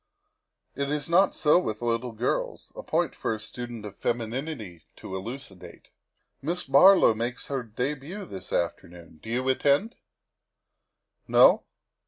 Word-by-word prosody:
It 140 +1 -2
is 150 -1 -2
not 180 +3 +4
so 155 +1 +4
with 110 -9 -4
little 120 +1 -1
girls. 115 +3 -3
A - - -6
point - - 0
for 110 - -2
a - - -9
student 120 0 -7
of 105 -1 -8
femininity 115 - -4
to 95 - -8
elucidate. 95 -4 -8 0.5
Miss 175 +5 -1
Barlow 140 - +6
makes 120 +3 -4
her 135 -2 -1
debut 140 - -4
this 95 - -9
afternoon, 85 -1 -4
do - - -10
you 125 +3 -1
attend? 140 - +2 1.3
No? - - +6
125 Hz, 135 wpm, -27 LUFS, 110-145 Hz, 1.3 s, Barlow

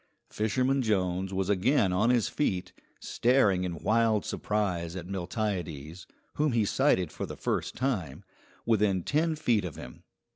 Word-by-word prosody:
Fisherman 130 +5 +1
Jones 95 -4 0
was 95 -1 -1
again 100 +1 +2
on 105 +6 +2
his 120 -3 +3
feet, 95 -11 -2 0.3
staring 110 -7 +2
in 85 -2 -5
wild 110 -1 +2
surprise 90 -5 -2
at 90 -2 -6
Miltiades, 90 -4 -4 0.3
whom 150 -3 +2
he 115 -3 +2
sighted 95 - +2
for - - -5
the - - -8
first - - -2
time, 100 - -2 0.4
within 105 -5 +2
ten 160 - +1
feet 115 -9 +1
of 85 -5 -5
him. - - -10
100 Hz, 145 wpm, -29 LUFS, 90-120 Hz, 0.4 s, his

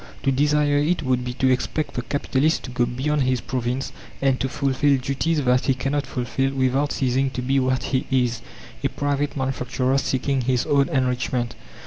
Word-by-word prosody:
To 135 - +3
desire 145 +1 +2
it 160 +4 +1
would 130 -2 +1
be 125 0 -4
to 130 0 +2
expect 150 +4 -1
the 125 - -2
capitalist 140 +4 0
to 125 - -7
go 120 -1 +1
beyond 140 +5 -1
his 130 -1 +1
province 125 +2 -3 0.3
and 135 -1 +2
to 135 - -1
fulfil 140 +1 +2
duties 140 +4 -1
that 125 0 +2
he 135 - +2
cannot 135 +3 -1
fulfil 135 +2 -1
without 135 +2 +1
ceasing 135 +1 +1
to 125 -1 -4
be 135 +2 +2
what 130 0 0
he 130 -1 -1
is 125 -3 +1 0.4
a - - +2
private 145 0 -1
manufacturer 130 0 0
seeking 135 0 0
his 125 0 +1
own 140 0 +2
enrichment. 125 -3 0
130 Hz, 180 wpm, -23 LUFS, 125-140 Hz, 0.4 s, To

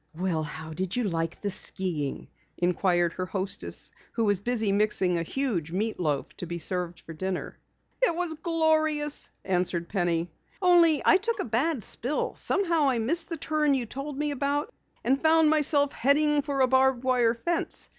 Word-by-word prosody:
"Well, 175 -2 -1
how 160 +1 -7
did 185 +3 -3
you 245 - 0
like 165 -4 -2
the 205 - -2
skiing?" 175 -7 0 0.3
inquired 175 -1 +1
her 185 0 -4
hostess 195 0 -3 0.2
who 230 - 0
was 205 -2 +2
busy 225 -2 0
mixing 200 -3 +1
a 170 - 0
huge 175 - -2
meat 215 +5 -2
loaf 150 -5 -2
to 180 - -6
be 170 +1 -4
served 175 0 -1
for 165 - -10
dinner. 185 +3 -5 0.4
"It - - +3
was 350 -2 0
glorious," 315 -2 +1 0.2
answered 180 -2 -1
Penny, 175 -3 -1 0.3
"only 345 -4 +5
I 365 - +6
took 460 +3 -2
a - - -2
bad 255 +3 0
spill. 255 +9 0
Somehow 335 -7 +1
I 255 - +1
missed 325 +10 +1
the 330 - -4
turn 300 -2 +1
you 255 -3 -2
told 275 +4 -7
me 295 0 -1
about, 285 +2 -2 0.3
and 270 +3 +1
found 320 -1 +4
myself 290 -2 +3
heading 295 +3 +2
for 280 -1 -2
a 260 - +5
barbed 260 -1 +2
wire 245 -3 +2
fence. 340 +8 -1
245 Hz, 175 wpm, -27 LUFS, 180-300 Hz, 0.4 s, I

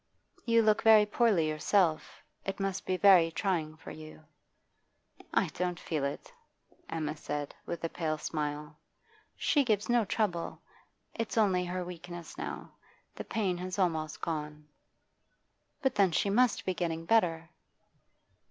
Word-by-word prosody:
'You 230 -1 +5
look 215 -1 +3
very 220 -1 +7
poorly 210 -7 +2
yourself. 155 +1 +1 0.2
It 195 - -4
must 195 -1 -3
be 185 - +1
very 180 -4 +6
trying 160 -3 -2
for - - -10
you.' 155 0 -11 1.1
'I - - +2
don't 180 -1 -3
feel 155 -4 -3
it,' 140 - -4 0.6
Emma 155 -2 -3
said, 145 -1 -4
with 170 - -5
a - - +1
pale 155 -2 -2
smile. 150 0 -4 0.6
'She 290 - +3
gives 215 -4 0
no 240 -1 +4
trouble. 195 -4 -2 0.5
It's 230 0 -4
only 190 -4 +3
her 180 0 -3
weakness 175 -1 -8
now; - - -6 0.4
the - - -6
pain 190 -5 -1
has 185 +1 -4
almost 160 -5 -1
gone.' 150 -2 -4 1.2
'But 265 - +2
then 200 -3 +3
she 200 +4 +1
must 245 +2 +2
be 185 - 0
getting 165 -2 -3
better. 165 -6 +2
175 Hz, 140 wpm, -31 LUFS, 155-205 Hz, 1.2 s, very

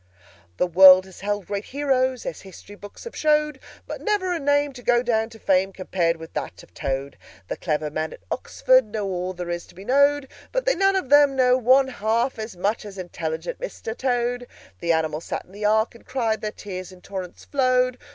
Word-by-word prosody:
"The - - +2
world 185 +1 +8
has 190 -1 -14
held 205 0 -2
great 200 0 -4
Heroes, 260 -2 0
As - - -5
history 195 +1 -13
books 205 0 -12
have 470 - -9
showed; 300 -2 +1 0.3
But - - -7
never 405 -4 0
a 340 - -2
name 285 0 +1
to 250 - -11
go 245 0 +3
down 225 -2 +1
to 225 - -13
fame 190 -2 +2
Compared 175 -3 -1
with 160 0 -11
that - - -5
of - - -20
Toad! 135 +1 -4 0.3
"The - - -3
clever 150 -2 -2
men 155 +1 -3
at - - -13
Oxford 255 -1 +3
Know 210 -1 -4
all 185 -1 -3
that 180 0 -5
there 175 0 -3
is 175 - -6
to - - -18
be 190 +3 -11
knowed. 280 +2 +3 0.2
But - - -1
they - - +4
none 390 +2 +2
of 375 -9 -1
them 290 -1 +6
know 250 -1 +4
one 260 +2 +4
half 230 +1 -1
as 220 -4 -6
much 205 +5 -1
As 205 -2 -10
intelligent 165 -2 -5
Mr. 365 - -6
Toad! 245 -1 -1 0.3
"The 170 - 0
animals 160 -1 -1
sat - - -4
in - - -21
the 205 +2 -5
Ark 220 +2 +2
and 235 - -16
cried, 230 -4 -1
Their 215 - -2
tears 185 -3 -7
in 185 -1 -15
torrents 185 -2 -7
flowed. 255 -2 +1
220 Hz, 215 wpm, -24 LUFS, 185-265 Hz, 0.3 s, world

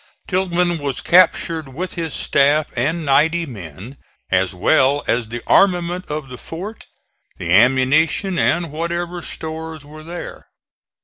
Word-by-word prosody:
Tilghman 180 -2 0
was 140 -2 -2
captured 165 -4 +3
with 180 +4 -4
his 165 -3 -3
staff 145 +2 +2
and 155 +7 -1
ninety 160 +5 +3
men, 105 - -10 0.3
as 95 0 +2
well 135 - +2
as 115 -1 0
the 120 +2 -6
armament 180 -1 +2
of 150 -2 -4
the 125 -1 -10
fort, 195 +7 -8 0.5
the 85 0 -1
ammunition 135 - +3
and 170 -3 +1
whatever 170 +2 -3
stores 160 -2 -6
were 155 +1 -12
there. 170 +2 -8
155 Hz, 130 wpm, -19 LUFS, 135-170 Hz, 0.5 s, captured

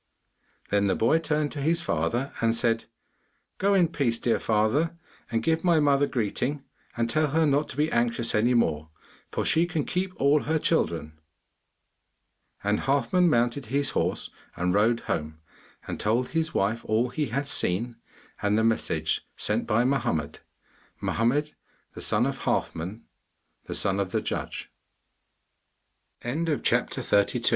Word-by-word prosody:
Then 100 0 +2
the 95 - +2
boy 140 +9 +3
turned 150 -2 -1
to 145 - -5
his 165 +4 +2
father 120 - -1
and 115 0 +2
said, 115 -1 +1 0.7
'Go 200 +1 +3
in 180 -3 +4
peace, 130 -8 0
dear 115 0 +1
father, 120 +11 +1 0.3
and 115 -1 -1
give 160 0 +1
my 170 -3 +4
mother 145 -1 +3
greeting 130 +4 -2 0.3
and 115 0 +1
tell 155 +6 +1
her 160 +3 +2
not 145 +1 +1
to - - -7
be 150 +2 +1
anxious 115 0 +1
any 120 +4 +3
more, 80 -9 +1 0.4
for - - -2
she 165 +2 +3
can 160 -4 -2
keep 185 +1 -1
all 140 +2 +4
her 160 +2 +1
children.' 85 - -1 1.4
And 105 +1 +1
Halfman 175 +6 +2
mounted 120 0 +1
his 140 +3 +1
horse - - -1 0.2
and 90 0 0
rode 110 +4 +3
home, 80 0 -3 0.5
and - - -5
told 115 +4 +1
his 160 0 -1
wife 110 +4 0
all 115 +3 +1
he 150 +4 -2
had 135 +5 -2
seen, 115 0 +1 0.4
and 105 +1 +2
the 110 - +2
message 115 0 0 0.2
sent - - -1
by 115 +3 +3
Mohammed 125 - -1 0.6
Mohammed 140 +7 0 0.4
the - - -9
son - - +2
o - - +1
125 Hz, 135 wpm, -26 LUFS, 110-150 Hz, 1.4 s, in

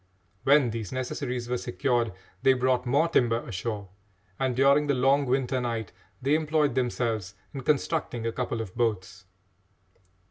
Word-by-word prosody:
When 140 -3 +5
these 110 -4 -5
necessaries 125 -1 -3
were 125 0 -1
secured, 120 -2 0 0.3
they 135 - +5
brought 125 0 +1
more 145 +7 +3
timber 120 -8 +1
ashore, 105 -1 -4 0.5
and, 130 -2 0
during 140 +3 +4
the 140 - +2
long 135 +2 +3
winter 130 0 +1
night, 115 -4 -3 0.3
they 140 +2 +2
employed 155 -3 +2
themselves 115 -6 -1 0.2
in 135 - -5
constructing 140 -3 0
a 115 - 0
couple 120 -1 -2
of 95 -5 -7
boats. 95 -5 -2
125 Hz, 145 wpm, -27 LUFS, 115-135 Hz, 0.5 s, When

